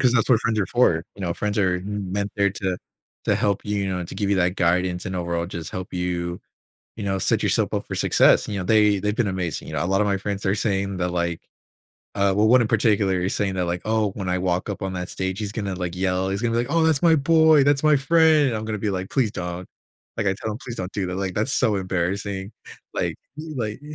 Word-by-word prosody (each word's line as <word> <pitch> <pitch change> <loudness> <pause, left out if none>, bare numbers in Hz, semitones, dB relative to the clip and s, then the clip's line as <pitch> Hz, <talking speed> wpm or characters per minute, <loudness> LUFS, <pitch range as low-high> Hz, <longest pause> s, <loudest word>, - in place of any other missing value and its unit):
'Cause 125 -3 +4
that's 115 -3 +2
what 115 -3 +4
friends 115 -1 0
are 100 - +1
for. 85 -10 +2
You 100 - -13
know, 85 -2 -1
friends 105 +1 -2
are 95 -3 +2
m 100 0 -5
meant 100 0 -2
there 100 -1 +3
to 95 -2 -2 0.5
to - - +3
help 100 -2 0
you, 105 0 -1
you - - -2
know, 90 -1 -2
to 85 - -9
give 100 0 -1
you 100 - +3
that 90 0 +1
guidance 90 +1 +1
and 95 - -4
overall 85 -1 -2
just 85 -3 -6
help 95 0 -6
you, 90 -1 -2 0.6
you 110 - -5
know, 95 -1 0
set - - +1
yourself - - +1
up - - -2
for - - -5
success. - - +4
You 100 - -3
know, 90 - -3
they 105 0 +4
they've 105 +1 -1
been 120 - +1
amazing, 90 -3 -3
you - - -6
know, - - 0
a - - -1
lot 95 +2 +1
of 105 - +2
my 100 - +1
friends 100 +1 -4
are 95 - +2
saying 100 -2 -1
that, 90 0 -1
like, 85 -1 -2 0.8
uh, 100 0 +3
well, 105 +1 +4
one 125 +2 +6
in 110 - -1
particular 100 -4 +2
is 95 +2 -1
saying 100 -2 -1
that, 90 -1 0
like, 85 +1 -2
"Oh, 110 -1 +1
when 95 -3 -5
I 90 0 +1
walk 90 +1 -1
up 100 - -5
on 95 -1 -2
that 90 0 -4
stage, 95 0 -3
he's 105 -2 -4
gonna, 100 -3 -3
like, 90 -1 -4
yell. 95 0 0
He's 100 +1 -2
gonna 120 -1 +1
be 115 - +1
like, 120 - 0
oh, 165 0 +3
that's 160 -4 +2
my 165 -2 +5
boy. 160 0 +5
That's 140 0 +3
my 150 -1 +6
friend." 155 -1 +4
I'm 110 0 -3
gonna 110 -1 -3
be, 105 +1 -1
like, 95 0 -4
"Please 125 -6 +1
don't," 90 0 -5 0.5
Like, 100 - -1
I 95 - +1
tell 110 +2 -4
him, 105 - -7
"Please 120 -2 -7
don't 90 0 -5
do 95 -3 -2
that. 90 - -4
Like, 95 -1 -3
that's 110 +6 0
so 115 -4 +2
embarrassing." 95 +2 -2 0.4
Like - - -1 0.2
like 135 -8 -5
100 Hz, 265 wpm, -23 LUFS, 90-110 Hz, 0.8 s, one